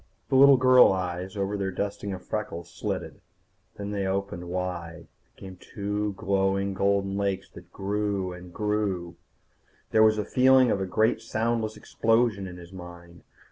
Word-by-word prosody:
The - - +1
little 140 0 +8
girl 130 -2 +7
eyes 95 +1 -3
over 100 +1 -1
their 100 -1 -2
dusting 100 +2 -4
of 95 -1 -7
freckles 105 -6 -5
slitted. - - -5 0.6
Then 100 0 -5
they 100 -2 -2
opened 95 -2 -3
wide, 85 -2 -4 0.3
became 95 -1 -11
two 105 +2 -3
glowing 95 0 0
golden 100 0 0
lakes 100 -1 -2
that - - -14
grew, 100 -2 -2
and 90 0 -11
grew 100 -4 -2 0.8
There 110 - +4
was 110 0 +5
the 105 - -1
feeling 130 -1 +5
of 100 - 0
a 95 - -2
great 110 +4 +1
soundless 110 -1 -1
explosion 115 -4 +1
in 90 -1 -9
his 90 +1 -13
mind. 85 -1 -11
100 Hz, 155 wpm, -26 LUFS, 90-105 Hz, 0.8 s, little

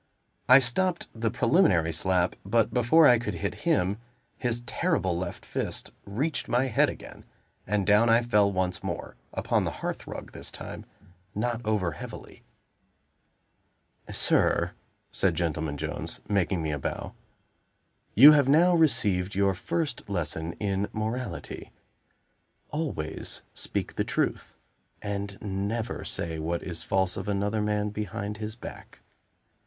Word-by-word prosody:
I 130 - +10
stopped 170 +8 +1
the 115 0 -1
preliminary 120 - +3
slap, 90 +2 +1
but 110 +2 +1
before 125 +7 +5
I 120 -4 +7
could 105 -5 -3
hit 80 - -2 0.2
him, 95 +4 +2 0.4
his 120 -2 -1
terrible 120 - 0
left 90 +2 -5
fist - - -3
reached 135 +11 -2
my 125 +2 +2
head 110 - +3
again; - - -10 0.4
and 100 0 +1
down 105 +3 +5
I 115 +1 +5
fell 105 -4 +3
once 95 -1 -1
more - - -5 0.2
upon - - 0
the - - -1 0.2
hearth - - -4
rug - - -7
this - - -8
time - - -8 0.5
not 120 +2 -1
over 105 -5 0
heavily. 75 - -9 1.7
"Sir," - - +2 0.4
said - - +1
Gentleman 80 -3 -2
Jones, - - -4
making 95 -4 +1
me 80 - -1
a 75 - -2
bow, - - -4 1.0
"you 140 +7 +11
have 145 -3 +4
now 170 +5 +5
received 105 - +2
your 100 0 +3
first 150 - -3
lesson 80 -3 -2
in 100 -1 -1
morality. 110 +4 -4 1.0
Always 135 - -3
speak - - -3
the - - +2
truth; - - -2 0.4
and 100 -1 -4
never 105 +4 -3
say 80 -1 -3
what 85 +2 -2
is 85 -3 -4
false 95 -1 +1
of 95 - -5
another 105 +1 0
man 105 0 0
behind 105 0 -4
his 110 0 -5
back. 120 - -11
105 Hz, 135 wpm, -27 LUFS, 95-120 Hz, 1.7 s, you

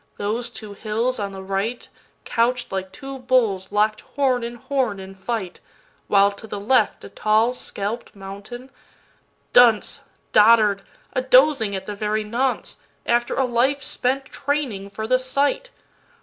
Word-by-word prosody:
those 225 +4 -2
two 215 -3 -9
hills 225 +4 -1
on 200 -1 -3
the 190 0 -8
right, 195 +5 -2 0.4
Couch'd 240 +1 0
like 190 -1 -3
two 270 -1 -8
bulls 230 -7 +1
lock'd 215 +1 +2 0.2
horn 260 -4 +2
in 235 +1 -5
horn 240 -4 -1
in 190 0 -9
fight, 190 -1 -4 0.5
While, 200 0 +5
to 200 +2 -11
the 205 - -5
left, 245 +6 +2
a - - -9
tall 220 +3 +2
scalp'd 220 -1 -5
mountain… 200 +7 -9 0.8
Dunce, 230 -4 +5 0.3
Dotard, 210 -2 +6 0.3
a 255 - +1
dozing 255 -5 +4
at 190 0 -5
the 210 - -5
very 215 +1 -1
nonce, 245 +5 -1 0.3
After 240 0 +1
a 265 - +2
life 255 +4 +1
spent 265 +1 -1
training 265 -10 -3
for 220 +2 -5
the 255 +3 +3
sight! 280 - 0
230 Hz, 150 wpm, -22 LUFS, 200-255 Hz, 0.8 s, Dotard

